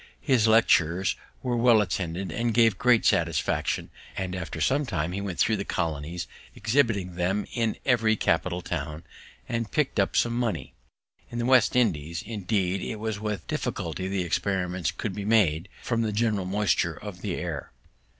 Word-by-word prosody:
His 125 -6 +3
lectures 95 -5 +4 0.3
were 125 -2 0
well 120 -1 +5
attended, 95 -2 -2
and 115 0 -1
gave 115 -4 +4
great 125 -2 +4
satisfaction; 80 -2 +1 0.3
and 95 -1 -2
after 85 -2 -5
some 135 - +2
time 85 -7 -1
he 100 +2 -3
went 95 -3 -4
thro' 110 - +3
the 100 - -3
colonies, 80 -1 -3 0.3
exhibiting 110 -7 +1
them 95 +4 0
in 115 -3 0
every 115 -4 +3
capital 90 -1 0
town, 75 -1 -4 0.4
and 115 -2 -2
pick'd 150 -8 0
up 100 - +1
some 120 - +2
money. 120 -2 -2 0.6
In 120 - -6
the 120 - -1
West 130 -1 +4
India 105 -13 +3
islands, 85 +1 -5
indeed, 100 -3 -1
it 110 - -4
was 110 -1 -3
with 105 -1 -3
difficulty 85 +3 -3
the 95 -1 -1
experiments 90 -1 -1
could 100 +2 -4
be 100 - -5
made, 100 -5 +2
from 115 -2 0
the 110 -2 0
general 105 -3 0
moisture 100 +1 +1
of - - -9
the - - -2
air. - - -5
100 Hz, 170 wpm, -27 LUFS, 90-115 Hz, 0.6 s, well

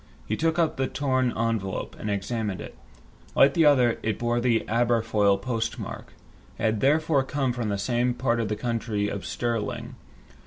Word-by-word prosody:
He 110 - 0
took 165 +6 0
up 165 -2 +1
the 135 0 0
torn 130 -3 0
envelope, 110 -4 -2
and 105 - -4
examined 100 -1 -2
it. - - -9 0.6
Like 140 0 +6
the 165 +1 +4
other, 125 -5 +4
it 110 -2 -1
bore 120 0 0
the 120 -2 +1
Aberfoyle 110 -3 +2
postmark. 115 0 -4 0.4
It - - -6
had 110 -1 +2
therefore 150 +1 +3
come 135 -1 -1
from 120 -3 -2
the 100 - -1
same 120 +4 0
part 120 -2 0
of 115 - 0
the 105 - -1
county 110 -3 -2
of 100 - -5
Stirling. 115 -3 -3
120 Hz, 170 wpm, -26 LUFS, 110-130 Hz, 0.6 s, Like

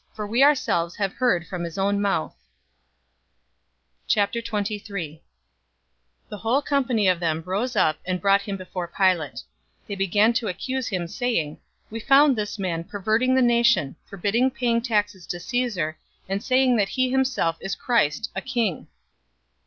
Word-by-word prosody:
For 210 -1 -4
we 230 +5 0
ourselves 175 - +2
have 195 -2 -2
heard 235 -9 +1
from 175 0 -5
his 170 +1 -6
own 200 +1 +1
mouth!" 195 -6 -1 1.7
023:001 205 -6 -2 1.1
The 210 - -7
whole 240 +7 0
company 255 -8 +1
of 180 -2 +3
them 165 -2 -1
rose 215 +7 -2
up 155 -6 +2
and 180 0 -2
brought 200 +1 +3
him 200 -1 -5
before 180 -1 -6
Pilate. 175 -5 0 0.4
023:002 - - -36
They 205 - -5
began 205 +4 +3
to 230 -1 -1
accuse 255 +7 -3
him, 180 -4 -2
saying, 170 - -2 0.3
"We 225 - -5
found 275 +3 +5
this 210 -1 -3
man 175 -4 -2
perverting 215 +7 0
the 260 - +4
nation, 235 - +3
forbidding 205 +7 0
paying 240 -3 0
taxes 205 -6 -1
to 175 - -4
Caesar, 185 -8 -2 0.3
and 195 +2 -2
saying 255 -1 +3
that 200 -2 +1
he 255 -1 0
himself 260 -11 +1
is 195 - -3
Christ, 220 - 0
a - - -2
king." 235 - -2
205 Hz, 155 wpm, -24 LUFS, 180-240 Hz, 1.7 s, found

